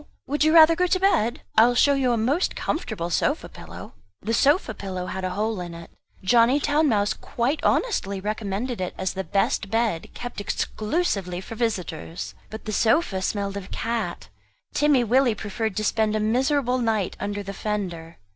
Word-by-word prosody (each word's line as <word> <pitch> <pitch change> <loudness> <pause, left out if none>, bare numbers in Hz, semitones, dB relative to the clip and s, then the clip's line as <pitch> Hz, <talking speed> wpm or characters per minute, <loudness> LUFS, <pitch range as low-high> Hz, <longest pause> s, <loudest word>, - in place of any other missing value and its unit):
Would 290 +2 0
you 310 - +4
rather 325 0 +8
go 360 +2 +2
to 370 +1 +1
bed? 295 - +2
I 225 +2 +7
will 245 - +1
show 285 +3 +5
you 265 -3 +2
a 235 - +1
most 270 +11 +1
comfortable 200 - -3
sofa - - 0
pillow." - - -11 0.3
The 225 +3 -1
sofa 280 0 +3
pillow 185 -3 -5
had 190 +1 -5
a 185 - 0
hole 210 +1 -2
in 175 -1 -7
it. 170 0 -11 0.3
Johnny 235 +7 +4
Town 295 +1 +2
mouse 205 -3 +2
quite 255 +6 -2
honestly 200 - +1
recommended 210 +3 -3
it 180 - -3
as 190 -1 -2
the 190 - -3
best 195 +1 0
bed, 225 -7 0
kept 245 -3 -6
exclusively 205 - -1
for 190 - -8
visitors. 190 -8 -3 0.2
But 220 - -9
the 215 - -3
sofa 220 - +2
smelt 200 +1 -2
of 195 -1 -6
cat. 225 -6 -3 0.4
Timmy 295 -4 +3
Willie 245 0 +3
preferred 210 0 -3
to 215 - 0
spend 215 0 +1
a - - +1
miserable 255 +3 +1
night 220 -5 0
under 205 0 -3
the 200 0 -6
fender. 180 -6 -4
220 Hz, 180 wpm, -24 LUFS, 195-255 Hz, 0.4 s, rather